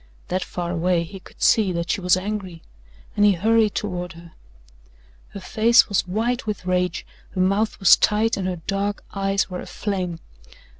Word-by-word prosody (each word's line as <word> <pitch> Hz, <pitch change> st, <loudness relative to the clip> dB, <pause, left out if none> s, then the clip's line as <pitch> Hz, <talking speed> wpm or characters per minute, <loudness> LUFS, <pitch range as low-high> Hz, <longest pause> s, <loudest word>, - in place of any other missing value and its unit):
That 185 Hz, +1 st, -1 dB
far 175 Hz, -1 st, -4 dB
away 175 Hz, 0 st, +1 dB
he 190 Hz, +4 st, -10 dB
could -, -, -11 dB
see 210 Hz, -4 st, +4 dB
that 170 Hz, 0 st, -2 dB
she -, -, -1 dB
was 180 Hz, 0 st, +3 dB
angry 190 Hz, -3 st, -5 dB, 0.5 s
and 205 Hz, -, +2 dB
he 205 Hz, -1 st, +6 dB
hurried 220 Hz, +3 st, +2 dB
toward 180 Hz, -4 st, -3 dB
her. 170 Hz, 0 st, -14 dB, 1.0 s
Her 200 Hz, -, -8 dB
face 225 Hz, +5 st, +4 dB
was 200 Hz, -2 st, 0 dB
white 230 Hz, +5 st, -1 dB
with 210 Hz, -3 st, -4 dB
rage, 180 Hz, -1 st, -1 dB, 0.3 s
her 185 Hz, -, +1 dB
mouth 200 Hz, +4 st, +1 dB
was 195 Hz, -, +7 dB
tight 220 Hz, +2 st, +2 dB
and 190 Hz, -2 st, -3 dB
her 180 Hz, -3 st, -4 dB
dark 200 Hz, +1 st, -2 dB
eyes 195 Hz, -1 st, 0 dB
were 180 Hz, -, -4 dB
aflame. 185 Hz, -5 st, -4 dB
195 Hz, 170 wpm, -22 LUFS, 180-210 Hz, 1.0 s, was